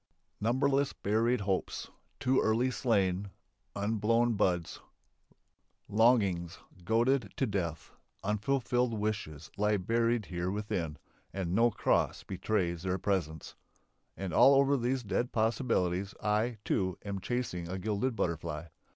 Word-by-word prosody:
Numberless 135 +5 +1
buried 115 +3 +1
hopes, 95 -2 -2 0.3
too 130 -1 +2
early 120 +4 +2
slain, 100 -6 +1 0.5
unblown 115 +3 +1
buds, 90 -5 0 1.1
longings 100 -6 +2 0.3
goaded 115 +2 +2
to 135 - +2
death, 85 - -3 0.3
unfulfilled 120 +3 0
wishes 100 -8 -3
lie 105 +1 +2
buried 115 +3 +1
here 90 0 -3
within 95 -6 -3 0.3
and 90 -3 -3
no 115 +4 +4
cross 110 - 0
betrays 90 -3 -1
their 95 0 -1
presence. 85 -6 -2 0.6
And 95 -4 -4
over 140 - +6
all 140 - +4
these 125 +2 0
dead 120 +4 -1
possibilities 105 -5 0
I, 110 +3 0
too, 95 -2 0
am 100 -1 -3
chasing 95 -7 -3
a 95 - -3
gilded 110 +5 -1
butterfly. 85 -3 -3
105 Hz, 115 wpm, -31 LUFS, 95-120 Hz, 1.1 s, over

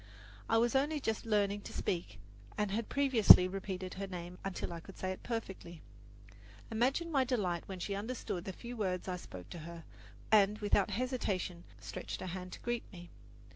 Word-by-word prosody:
I 225 - +4
was 235 +3 +3
only 295 +3 +2
just 225 -3 -2
learning 205 -1 +2
to - - -9
speak, 170 - -2 0.4
and 210 -2 0
had 220 +2 -2
previously 240 -10 +8
repeated 190 -1 -4
her 195 +1 -4
name 180 -1 -7
until 195 -2 -3
I 170 - -5
could 190 +3 -12
say 185 - -2
it 185 - -6
perfectly. 190 -8 -5 0.9
Imagine 270 +9 +1
my 275 -4 +4
delight 200 -10 -1
when 190 - -5
she 200 - -2
understood 200 -4 -3
the 190 - -3
few 240 +6 -8
words 185 -5 -1
I 180 -1 -2
spoke 90 - -10
to 175 - -6
her 165 +1 -8 0.5
and 210 -1 +6
without 205 -2 +2
hesitation 200 -8 -2
stretched 185 - -6
her - - -4
hand 180 0 -5
to - - -8
greet 240 -1 -3
me. 175 -3 -11
195 Hz, 180 wpm, -34 LUFS, 180-230 Hz, 0.9 s, previously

